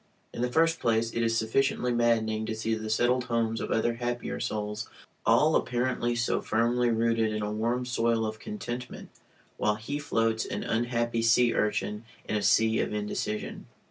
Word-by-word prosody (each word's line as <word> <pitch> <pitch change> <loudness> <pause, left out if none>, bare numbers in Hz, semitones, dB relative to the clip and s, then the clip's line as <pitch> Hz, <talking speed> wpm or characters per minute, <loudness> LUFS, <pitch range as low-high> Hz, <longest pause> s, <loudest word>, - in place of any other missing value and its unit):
In - - -4
the 125 0 0
first 165 +4 +3
place, 115 0 +1
it 115 - -1
is 115 0 +1
sufficiently 125 +2 +1
maddening 110 -2 +1
to 110 - -2
see 110 +1 -1
the 110 -1 -3
settled 125 +3 +2
homes 115 -1 0
of - - -4
other 115 +1 +1
happier 120 0 -3
souls, 105 0 -3 0.4
all - - +5
apparently 120 -1 0
so 115 0 0
firmly 120 +2 +1
rooted 115 -1 +1
in 110 0 -2
a 105 - -2
warm 120 +4 -1
soil 115 -2 +1
of 110 0 -4
contentment 125 - -6 0.5
while 105 0 +1
he 125 +7 -4
floats, 115 -5 0
an - - -4
unhappy 120 0 0
sea 115 +1 +4
urchin, 105 0 -1 0.2
in - - -2
an 105 - +2
ocean 110 +2 +3
of - - -1
indecision. 105 0 -3
115 Hz, 175 wpm, -28 LUFS, 110-120 Hz, 0.5 s, all